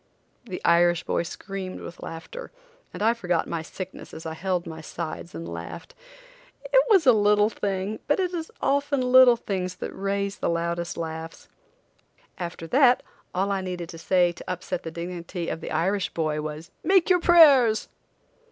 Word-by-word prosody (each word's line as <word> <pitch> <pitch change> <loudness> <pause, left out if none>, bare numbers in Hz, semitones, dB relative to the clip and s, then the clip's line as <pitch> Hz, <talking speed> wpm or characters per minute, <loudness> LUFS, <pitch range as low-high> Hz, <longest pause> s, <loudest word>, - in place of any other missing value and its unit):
The 185 -6 -7
Irish 170 0 +4
boy - - 0
screamed 185 +2 -6
with 170 - -9
laughter, 470 - -8 0.4
and - - -5
I 225 +1 +4
forgot 180 -7 -1
my 165 -1 -3
sickness 180 +3 -8
as 160 - -9
I 160 - -4
held 180 +1 -2
my 160 -1 -7
sides 165 +1 -6
and 85 0 -6
laughed. 85 - -8 0.7
It - - +4
was 390 -7 +5
a 250 - +8
little 210 0 +3
thing, 200 +1 -3
but 290 - +2
it 365 -1 0
is 325 -2 -4
often 280 0 +1
little 250 -1 +7
things 185 -5 -3
that - - -6
raise 200 0 -2
the - - 0
loudest 170 +1 -2
laughs. 160 0 -6 0.9
After 170 -2 -5
that 250 - +4 0.3
all 195 +2 +1
I 195 -1 0
needed 180 -2 -5
to 165 - -9
say 175 0 +3
to 175 - -7
upset 180 -1 -4
the 165 - -6
dignity 170 +1 -5
of - - -4
the - - -6
Irish 190 +4 0
boy 155 -2 -1
was: 155 +2 -7
"Make 375 -1 +4
your 360 - +5
prayers!" 285 -11 +6
185 Hz, 170 wpm, -25 LUFS, 170-235 Hz, 0.9 s, a